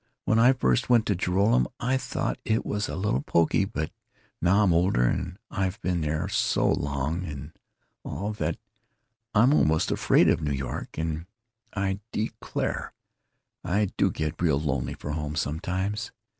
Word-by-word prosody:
When 110 Hz, -, +3 dB
I 125 Hz, +3 st, +7 dB
first 65 Hz, -, +1 dB
went 120 Hz, -3 st, +5 dB
to 100 Hz, -, +1 dB
Joralemon, 90 Hz, -, +2 dB
I 125 Hz, +2 st, +1 dB
thought 130 Hz, -, -2 dB
it 110 Hz, +1 st, 0 dB
was 105 Hz, 0 st, -2 dB
a -, -, -3 dB
little 95 Hz, -9 st, 0 dB
pokey, 85 Hz, +5 st, +2 dB
but 80 Hz, -7 st, -3 dB, 0.5 s
now 100 Hz, +5 st, +4 dB
I'm 90 Hz, -4 st, +4 dB
older, 85 Hz, -7 st, +3 dB
and 90 Hz, +8 st, -1 dB
I've 95 Hz, 0 st, -1 dB
been 90 Hz, -1 st, 0 dB
there 80 Hz, +3 st, -1 dB
so 100 Hz, -, +1 dB
long 75 Hz, +5 st, -1 dB
and 70 Hz, -6 st, -7 dB, 0.5 s
all, 100 Hz, +8 st, -3 dB
that 85 Hz, -5 st, -2 dB, 0.8 s
I'm 120 Hz, +7 st, +6 dB
almost 80 Hz, -, +3 dB
afraid -, -, +4 dB
of -, -, +3 dB
New 75 Hz, -1 st, -1 dB
York, 65 Hz, 0 st, -5 dB
and 80 Hz, +1 st, -2 dB, 0.5 s
I 95 Hz, -1 st, -1 dB
declare 110 Hz, +1 st, -3 dB, 0.7 s
I 100 Hz, +2 st, +1 dB
do -, -, +3 dB
get 80 Hz, +2 st, -3 dB
real 75 Hz, -5 st, +3 dB
lonely 70 Hz, -5 st, -2 dB
for 75 Hz, -, -6 dB
home 75 Hz, -1 st, -3 dB
sometimes. 95 Hz, +8 st, -2 dB
90 Hz, 155 wpm, -27 LUFS, 75-100 Hz, 0.8 s, I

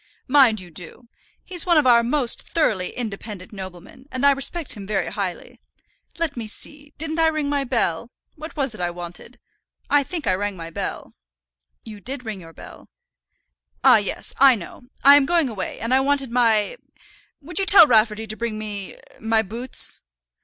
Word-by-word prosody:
"Mind 255 Hz, -6 st, +5 dB
you 180 Hz, -2 st, -12 dB
do. 180 Hz, +9 st, -11 dB, 0.3 s
He's 360 Hz, -2 st, -3 dB
one 340 Hz, -2 st, +4 dB
of 300 Hz, -, +4 dB
our 240 Hz, -2 st, +6 dB
most 245 Hz, +1 st, 0 dB
thoroughly 205 Hz, -, 0 dB
independent 210 Hz, -4 st, -6 dB
noblemen, 190 Hz, +6 st, -10 dB
and 260 Hz, +2 st, -1 dB
I 280 Hz, -, +7 dB
respect 280 Hz, +3 st, -1 dB
him 200 Hz, -2 st, -8 dB
very 210 Hz, -2 st, -1 dB
highly. 190 Hz, -4 st, -5 dB, 0.6 s
Let 330 Hz, -4 st, -2 dB
me 230 Hz, -3 st, -5 dB
see; 290 Hz, +6 st, -7 dB
didn't 315 Hz, +1 st, -3 dB
I 325 Hz, -, +4 dB
ring 310 Hz, -2 st, -1 dB
my 285 Hz, -1 st, 0 dB
bell? 235 Hz, -5 st, -1 dB, 0.3 s
What 315 Hz, +1 st, -9 dB
was 275 Hz, -4 st, 0 dB
it 215 Hz, -, -8 dB
I 175 Hz, -, 0 dB
wanted? 175 Hz, 0 st, -9 dB, 0.5 s
I 290 Hz, -, +5 dB
think 320 Hz, +2 st, -5 dB
I 185 Hz, -, +3 dB
rang 200 Hz, +1 st, -2 dB
my 165 Hz, 0 st, -8 dB
bell." -, -, -5 dB, 0.7 s
"You 215 Hz, -2 st, -10 dB
did 255 Hz, +3 st, -5 dB
ring 210 Hz, -4 st, -5 dB
your 165 Hz, -1 st, -12 dB
bell." -, -, -14 dB, 0.9 s
"Ah, -, -, +8 dB
yes; -, -, -3 dB
I 270 Hz, -2 st, +7 dB
know. 205 Hz, +4 st, -10 dB, 0.2 s
I 280 Hz, +1 st, +9 dB
am 275 Hz, -2 st, +2 dB
going 335 Hz, -5 st, +2 dB
away, 200 Hz, -5 st, -5 dB
and 230 Hz, +3 st, -1 dB
I 260 Hz, -, +5 dB
wanted 275 Hz, -2 st, 0 dB
my 230 Hz, -, +2 dB, 0.6 s
would 315 Hz, +4 st, -4 dB
you 390 Hz, -, 0 dB
tell 390 Hz, -4 st, +9 dB
Rafferty 220 Hz, -3 st, +3 dB
to 215 Hz, 0 st, -4 dB
bring 230 Hz, -1 st, -4 dB
me 205 Hz, -3 st, -6 dB, 0.2 s
my 225 Hz, 0 st, +2 dB
boots?" 235 Hz, +5 st, -2 dB
235 Hz, 180 wpm, -22 LUFS, 205-285 Hz, 0.9 s, I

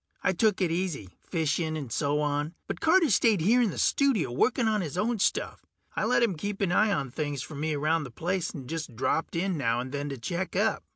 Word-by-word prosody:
I 185 Hz, -, +2 dB
took 205 Hz, +2 st, +2 dB
it 175 Hz, -3 st, +2 dB
easy, 165 Hz, -, -2 dB
fishing 160 Hz, -1 st, -1 dB
and 135 Hz, -6 st, -6 dB
so 145 Hz, +4 st, 0 dB
on, 150 Hz, +2 st, -1 dB
but -, -, -5 dB
Carter 325 Hz, -3 st, +4 dB
stayed 215 Hz, 0 st, +4 dB
here 225 Hz, +10 st, +4 dB
in 230 Hz, -, +2 dB
the -, -, -6 dB
studio 245 Hz, -, +2 dB
working 235 Hz, -, +2 dB
on 215 Hz, -2 st, +1 dB
his 165 Hz, -1 st, -5 dB
own 225 Hz, +3 st, 0 dB
stuff. -, -, 0 dB, 0.3 s
I -, -, 0 dB
let -, -, +3 dB
him 225 Hz, -5 st, +2 dB
keep 200 Hz, +5 st, -4 dB
an 190 Hz, -3 st, +1 dB
eye 215 Hz, +4 st, +3 dB
on 140 Hz, -9 st, -1 dB
things 145 Hz, -1 st, -3 dB
for -, -, -9 dB
me 155 Hz, +2 st, -2 dB
around 155 Hz, +2 st, +1 dB
the -, -, -8 dB
place, 175 Hz, +7 st, -2 dB
and 135 Hz, -4 st, -8 dB
just 155 Hz, -5 st, -5 dB
dropped 160 Hz, +8 st, -1 dB
in 175 Hz, -1 st, -1 dB
now 115 Hz, -3 st, +1 dB
and 130 Hz, +1 st, -5 dB
then 145 Hz, +1 st, -3 dB
to 135 Hz, -, -5 dB
check 175 Hz, +10 st, -3 dB
up. 210 Hz, +2 st, +1 dB
165 Hz, 235 wpm, -28 LUFS, 145-200 Hz, 0.3 s, Carter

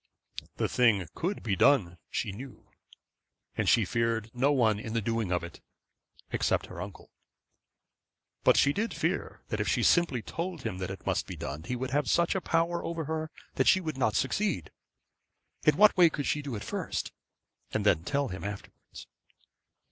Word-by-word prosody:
The -, -, 0 dB
thing 110 Hz, -8 st, +3 dB
could 185 Hz, +5 st, -3 dB
be 100 Hz, -4 st, 0 dB
done, 95 Hz, -10 st, +3 dB
she -, -, -2 dB
know; 125 Hz, +6 st, -11 dB, 0.8 s
and -, -, +1 dB
she 115 Hz, -, +5 dB
feared 115 Hz, +1 st, -1 dB
no 130 Hz, +4 st, +2 dB
one 110 Hz, -7 st, +3 dB
in 110 Hz, +1 st, -6 dB
the 115 Hz, -, +1 dB
doing 115 Hz, -3 st, -1 dB
of 90 Hz, -1 st, 0 dB
it, 85 Hz, -1 st, -9 dB, 0.7 s
except -, -, +1 dB
her -, -, -8 dB
uncle. -, -, -9 dB, 1.3 s
But -, -, +5 dB
she 140 Hz, -, +4 dB
did 220 Hz, +6 st, -2 dB
fear -, -, -2 dB
that -, -, -2 dB
if -, -, -1 dB
she -, -, +1 dB
simply 165 Hz, -10 st, +3 dB
told 170 Hz, -3 st, -5 dB
him 100 Hz, -5 st, -3 dB
that 95 Hz, -1 st, -3 dB
it 95 Hz, -, -8 dB
must -, -, 0 dB
be -, -, -6 dB
done, 75 Hz, +4 st, -6 dB
he 125 Hz, -, -2 dB
would 130 Hz, +1 st, -4 dB
have 145 Hz, +2 st, +1 dB
such 170 Hz, 0 st, +3 dB
a 190 Hz, -, -1 dB
power 170 Hz, +1 st, 0 dB
over 165 Hz, -2 st, -3 dB
her 160 Hz, +1 st, -3 dB, 0.3 s
that -, -, +2 dB
she 190 Hz, -, +6 dB
would 160 Hz, -5 st, -4 dB
not 115 Hz, -5 st, +1 dB
succeed. 95 Hz, -, 0 dB, 1.0 s
In 150 Hz, -1 st, +5 dB
what 210 Hz, +1 st, +7 dB
way 175 Hz, -3 st, +7 dB
could 145 Hz, -3 st, -4 dB
she 150 Hz, -, 0 dB
do 140 Hz, -5 st, -5 dB
it 105 Hz, -, -5 dB
first, -, -, -3 dB, 0.6 s
and 105 Hz, -, -1 dB
then 85 Hz, -6 st, +3 dB
tell 140 Hz, +6 st, 0 dB
him 95 Hz, 0 st, -6 dB
afterwards? 100 Hz, 0 st, -8 dB
125 Hz, 185 wpm, -29 LUFS, 105-160 Hz, 1.3 s, what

